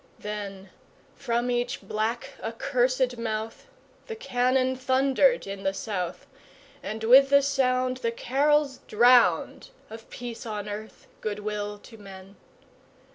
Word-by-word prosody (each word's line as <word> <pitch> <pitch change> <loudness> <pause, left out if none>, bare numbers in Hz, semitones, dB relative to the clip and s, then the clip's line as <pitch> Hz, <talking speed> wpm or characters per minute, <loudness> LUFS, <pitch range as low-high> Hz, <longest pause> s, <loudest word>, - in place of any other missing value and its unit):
Then 200 -2 -7 0.4
from 240 +1 -1
each 245 -2 -2
black, 220 +3 -2
accursed 250 +1 0
mouth 220 - -4 0.4
The 450 - -5
cannon 255 - +1
thundered 265 - +2
in 195 0 -6
the 195 0 -1
South, 180 -5 -4 0.6
And 220 +1 -6
with 265 +4 +7
the 280 0 +5
sound 255 -2 +1
The 235 -2 -1
carols 280 +3 +1
drowned 245 - +4 0.2
Of 225 0 -11
peace 240 -1 -7
on 210 -1 -5
earth, 210 +1 -8 0.2
good 210 -1 -3
will 210 0 -4
to 225 +2 -15
men! 195 -1 -12
235 Hz, 125 wpm, -26 LUFS, 210-260 Hz, 0.6 s, with